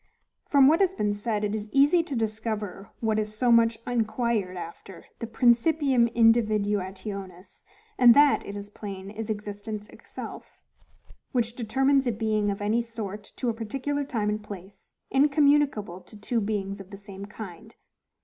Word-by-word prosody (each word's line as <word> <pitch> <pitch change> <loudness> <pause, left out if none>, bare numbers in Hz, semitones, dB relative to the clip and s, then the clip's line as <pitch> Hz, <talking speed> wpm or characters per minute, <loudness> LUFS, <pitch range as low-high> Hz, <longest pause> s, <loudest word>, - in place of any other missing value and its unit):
From 275 -2 +6
what 315 +3 +5
has 380 -1 +2
been 210 - 0
said, 210 +1 -2
it 210 0 -1
is 215 0 -4
easy 290 +5 +5
to 305 -4 -5
discover 215 -3 -3
what 220 -1 +1
is 215 0 -3
so 245 +1 +3
much 230 -1 +4
inquired 220 -5 -1
after, 175 +2 -9
the 230 - -4
PRINCIPIUM 245 +2 +3
INDIVIDUATIONIS; 205 -4 0 0.3
and 240 -2 +8
that, 290 0 +5
it 200 - -7
is 205 0 -7
plain, 195 -2 -7
is 220 +1 -6
existence 210 0 -5
itself; - - -10 0.8
which 235 -2 0
determines 265 +3 +2
a - - +3
being 215 -1 0
of 200 0 -3
any 220 +3 +2
sort 215 -3 -6
to 250 - -1
a - - 0
particular 270 +6 -3
time 230 -7 -1
and 210 0 -2
place, 195 -1 -11 0.2
incommunicable 280 - +3
to 215 - -13
two 230 +2 -1
beings 200 -1 -3
of 195 - -13
the 200 - -9
same 200 0 -9
kind. 215 +1 -10
220 Hz, 160 wpm, -26 LUFS, 205-240 Hz, 0.8 s, and